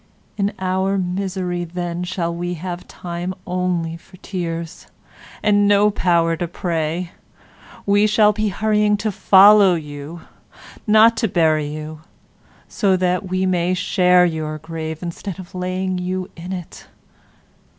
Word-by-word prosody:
In 200 Hz, 0 st, 0 dB
our 190 Hz, +1 st, 0 dB
misery 180 Hz, -1 st, -2 dB
then 175 Hz, 0 st, -4 dB
we 180 Hz, -, -3 dB
shall 170 Hz, -1 st, -3 dB
have 175 Hz, +1 st, -6 dB
time 175 Hz, +1 st, -5 dB
only 180 Hz, -2 st, -2 dB
for 185 Hz, +3 st, -18 dB
tears 170 Hz, -2 st, -5 dB, 0.6 s
and 205 Hz, -1 st, +3 dB
no 205 Hz, +1 st, +4 dB
power 170 Hz, -4 st, +2 dB
to 175 Hz, -, -2 dB
pray; 170 Hz, 0 st, -3 dB, 0.7 s
we 205 Hz, +1 st, +3 dB
shall 210 Hz, 0 st, +4 dB
be 215 Hz, 0 st, -1 dB
hurrying 210 Hz, +1 st, +1 dB
to 215 Hz, +1 st, -2 dB
follow, 195 Hz, -1 st, +6 dB, 1.1 s
not 220 Hz, +2 st, +6 dB
to 225 Hz, -, +1 dB
bury 155 Hz, -5 st, +2 dB
you, 155 Hz, +1 st, -7 dB, 0.7 s
so 195 Hz, -3 st, +1 dB
that 180 Hz, +1 st, -1 dB
we 185 Hz, +1 st, 0 dB
may 180 Hz, -1 st, +1 dB
share 180 Hz, 0 st, +3 dB
your 155 Hz, -2 st, -3 dB
grave 160 Hz, 0 st, -6 dB
instead 175 Hz, +2 st, -6 dB
of 185 Hz, -2 st, -11 dB
laying 185 Hz, 0 st, -2 dB
you 185 Hz, +1 st, -4 dB
in 175 Hz, +2 st, -8 dB
it. 180 Hz, -3 st, -8 dB
180 Hz, 130 wpm, -20 LUFS, 170-195 Hz, 1.1 s, follow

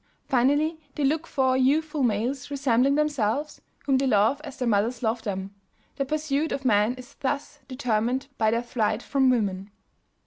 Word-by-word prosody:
Finally 290 Hz, +5 st, +2 dB, 0.2 s
they 295 Hz, -, -2 dB
look 310 Hz, +4 st, +1 dB
for 260 Hz, -3 st, +1 dB
youthful 295 Hz, +3 st, +1 dB
males 245 Hz, +4 st, -1 dB
resembling 275 Hz, -1 st, +2 dB
themselves, 290 Hz, -2 st, -1 dB, 0.2 s
whom 270 Hz, -2 st, +3 dB
they 270 Hz, -, +1 dB
love 225 Hz, +5 st, +3 dB
as 280 Hz, -4 st, -9 dB
their 250 Hz, -, -1 dB
mothers 230 Hz, +3 st, +1 dB
loved 225 Hz, +1 st, -1 dB
them. 195 Hz, -1 st, -4 dB, 0.4 s
Their 275 Hz, -2 st, -1 dB
pursuit 305 Hz, +1 st, -1 dB
of 270 Hz, -, -3 dB
men 215 Hz, 0 st, +3 dB
is 255 Hz, -1 st, -12 dB
thus 285 Hz, +2 st, -3 dB
determined 250 Hz, 0 st, -1 dB
by 220 Hz, -, +3 dB
their 230 Hz, +2 st, 0 dB
flight 230 Hz, -2 st, -1 dB
from 270 Hz, -2 st, +2 dB
women. 200 Hz, -5 st, 0 dB
260 Hz, 165 wpm, -26 LUFS, 225-285 Hz, 0.4 s, whom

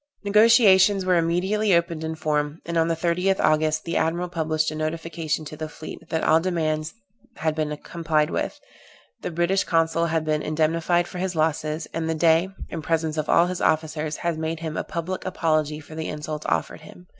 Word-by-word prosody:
Negociations 205 Hz, -2 st, +5 dB
were 185 Hz, -1 st, +3 dB
immediately 185 Hz, +4 st, +2 dB
opened 170 Hz, -2 st, 0 dB
in 160 Hz, 0 st, -3 dB
form; 150 Hz, 0 st, -1 dB
and 170 Hz, -, -4 dB
on 165 Hz, 0 st, +3 dB
the 165 Hz, -, +1 dB
30th 180 Hz, +3 st, +1 dB
August 155 Hz, 0 st, +2 dB
the 170 Hz, -, -2 dB
admiral 170 Hz, +2 st, 0 dB
published 155 Hz, -2 st, 0 dB
a -, -, -6 dB
notification 155 Hz, 0 st, -3 dB
to 155 Hz, -, -8 dB
the 155 Hz, 0 st, -5 dB
fleet, 155 Hz, -, -10 dB
that 160 Hz, -, -1 dB
all 160 Hz, +1 st, +5 dB
demands 160 Hz, -2 st, -1 dB, 0.4 s
had 155 Hz, 0 st, -1 dB
been 155 Hz, -1 st, -2 dB
complied 155 Hz, -2 st, -1 dB
with, -, -, -3 dB, 0.6 s
the -, -, -3 dB
British 175 Hz, +3 st, +1 dB
consul 165 Hz, 0 st, +1 dB
had 160 Hz, -1 st, -1 dB
been 155 Hz, -1 st, 0 dB
indemnified 165 Hz, +3 st, +1 dB
for 180 Hz, -, -7 dB
his 185 Hz, -1 st, -2 dB
losses, 155 Hz, 0 st, -1 dB
and 165 Hz, 0 st, -2 dB
the 160 Hz, -, 0 dB
Dey, 165 Hz, +3 st, +3 dB, 0.2 s
in 165 Hz, -, -5 dB
presence 160 Hz, 0 st, -1 dB
of 155 Hz, -1 st, -2 dB
all 170 Hz, -, +5 dB
his 180 Hz, 0 st, -4 dB
officers, 155 Hz, -1 st, 0 dB
had 170 Hz, -2 st, -2 dB
made 160 Hz, 0 st, -3 dB
him 160 Hz, -2 st, -4 dB
a -, -, -1 dB
public 175 Hz, +3 st, -4 dB
apology 155 Hz, -4 st, 0 dB
for 155 Hz, +1 st, -13 dB
the 160 Hz, 0 st, -4 dB
insults 150 Hz, 0 st, -5 dB
offered -, -, -1 dB
him. 180 Hz, -, -14 dB
160 Hz, 190 wpm, -24 LUFS, 155-175 Hz, 0.6 s, Negociations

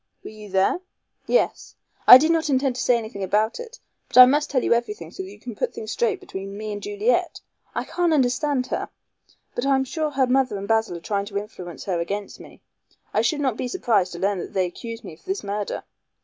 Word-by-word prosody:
"Were -, -, -8 dB
you 215 Hz, -1 st, -11 dB
there?" 190 Hz, -, +2 dB, 0.5 s
"Yes. -, -, 0 dB, 0.3 s
I 250 Hz, -, +13 dB
did 310 Hz, +5 st, +2 dB
not 320 Hz, -2 st, +1 dB
intend 265 Hz, -1 st, +1 dB
to -, -, -3 dB
say 245 Hz, -, +3 dB
anything 220 Hz, -3 st, -6 dB
about 210 Hz, -, +1 dB
it, 480 Hz, +1 st, -9 dB, 0.3 s
but 250 Hz, -, -3 dB
I 255 Hz, -, +13 dB
must 295 Hz, +4 st, +2 dB
tell 255 Hz, -3 st, +1 dB
you -, -, +3 dB
everything 210 Hz, -8 st, -3 dB
so -, -, -7 dB
that 190 Hz, -, -7 dB
you 205 Hz, +1 st, -13 dB
can 240 Hz, +2 st, -8 dB
put -, -, -2 dB
things 450 Hz, -1 st, -6 dB
straight 440 Hz, -5 st, 0 dB
between 195 Hz, +1 st, -7 dB
me 215 Hz, 0 st, -4 dB
and 205 Hz, -, -6 dB
Juliet. 415 Hz, +4 st, 0 dB, 0.4 s
I -, -, -1 dB
can't 350 Hz, -1 st, 0 dB
understand 265 Hz, -1 st, +1 dB
her. -, -, -3 dB, 0.6 s
But 245 Hz, +3 st, -2 dB
I 275 Hz, -, +4 dB
am 265 Hz, -, +2 dB
sure 305 Hz, +4 st, -2 dB
her 270 Hz, -2 st, +2 dB
mother 255 Hz, -3 st, +1 dB
and 200 Hz, 0 st, -6 dB
Basil 220 Hz, -5 st, +1 dB
are -, -, -11 dB
trying 200 Hz, +2 st, -2 dB
to 200 Hz, -1 st, -5 dB
influence 195 Hz, -4 st, -7 dB
her 180 Hz, -3 st, -1 dB
against 200 Hz, +4 st, -4 dB
me. -, -, -14 dB, 0.5 s
I -, -, +3 dB
should 305 Hz, -3 st, 0 dB
not 260 Hz, -5 st, 0 dB
be 255 Hz, -, -2 dB
surprised 220 Hz, -, +1 dB
to -, -, -6 dB
learn 195 Hz, +1 st, 0 dB
that -, -, -7 dB
they 190 Hz, -2 st, +2 dB
accused 230 Hz, +6 st, -7 dB
me 185 Hz, -, -9 dB
of 155 Hz, -, -18 dB
this 385 Hz, +1 st, -3 dB
murder." 205 Hz, 0 st, -3 dB
235 Hz, 235 wpm, -23 LUFS, 200-285 Hz, 0.6 s, I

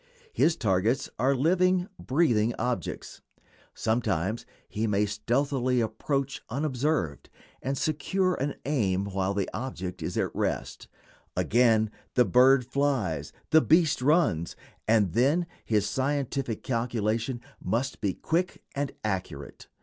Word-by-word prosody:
His 160 Hz, -, +3 dB
targets 110 Hz, -, +1 dB
are 135 Hz, +3 st, +3 dB
living, 180 Hz, +5 st, +2 dB
breathing 120 Hz, -6 st, +2 dB
objects. 125 Hz, 0 st, -3 dB, 0.5 s
Sometimes 110 Hz, -2 st, -1 dB, 0.2 s
he 110 Hz, +2 st, -2 dB
may 105 Hz, 0 st, +2 dB
stealthily 125 Hz, +4 st, 0 dB
approach, 135 Hz, +5 st, -2 dB
unobserved, 135 Hz, -, -1 dB, 0.3 s
and 135 Hz, +1 st, -2 dB
secure 185 Hz, +6 st, 0 dB
an 140 Hz, -2 st, -2 dB
aim 100 Hz, -10 st, +1 dB
while 100 Hz, 0 st, -1 dB
the 100 Hz, -2 st, 0 dB
object 95 Hz, -8 st, -5 dB
is -, -, -3 dB
at -, -, 0 dB
rest; -, -, -2 dB, 0.5 s
again, 110 Hz, -2 st, +3 dB, 0.2 s
the 125 Hz, -, +5 dB
bird 125 Hz, +5 st, +5 dB
flies, 120 Hz, -, -1 dB, 0.2 s
the 160 Hz, -, +7 dB
beast 160 Hz, -4 st, +3 dB
runs, 135 Hz, -, +2 dB, 0.3 s
and 105 Hz, -6 st, +3 dB
then 140 Hz, -, +3 dB, 0.2 s
his 105 Hz, -2 st, +1 dB
scientific 135 Hz, -2 st, -1 dB
calculation 115 Hz, -1 st, -1 dB, 0.2 s
must 130 Hz, +3 st, -1 dB
be 100 Hz, -2 st, 0 dB
quick 175 Hz, +2 st, -1 dB
and 140 Hz, 0 st, -2 dB
accurate. 90 Hz, -9 st, -4 dB
125 Hz, 120 wpm, -28 LUFS, 105-140 Hz, 0.5 s, the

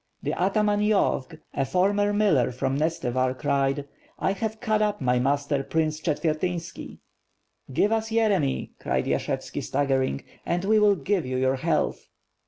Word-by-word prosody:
The -, -, -1 dB
ataman 205 Hz, +3 st, +1 dB
Yovk, 210 Hz, -10 st, +1 dB
a 135 Hz, -, 0 dB
former 200 Hz, +6 st, +2 dB
miller 205 Hz, -, +3 dB
from 130 Hz, +2 st, -1 dB
Nestevar 130 Hz, -5 st, 0 dB
cried: 140 Hz, 0 st, 0 dB, 0.3 s
"I -, -, 0 dB
have 220 Hz, +2 st, -3 dB
cut 215 Hz, -3 st, +1 dB
up 210 Hz, -1 st, +1 dB
my 125 Hz, -2 st, +2 dB
master 140 Hz, +2 st, +1 dB
Prince 155 Hz, +1 st, -1 dB
Chetvertynski." 165 Hz, +2 st, -2 dB, 0.7 s
"Give 200 Hz, +11 st, +2 dB
us 225 Hz, 0 st, 0 dB
Yere 220 Hz, -4 st, +3 dB
my," 140 Hz, -3 st, -2 dB
cried 65 Hz, 0 st, -1 dB
Yashevski -, -, -2 dB
staggering, 135 Hz, -1 st, 0 dB, 0.2 s
"and 175 Hz, +2 st, -1 dB
we 215 Hz, +2 st, +4 dB
will 205 Hz, -1 st, +5 dB
give 185 Hz, +3 st, 0 dB
you 130 Hz, 0 st, -2 dB
your 130 Hz, +1 st, +1 dB
health." -, -, -1 dB
160 Hz, 150 wpm, -26 LUFS, 135-205 Hz, 0.7 s, will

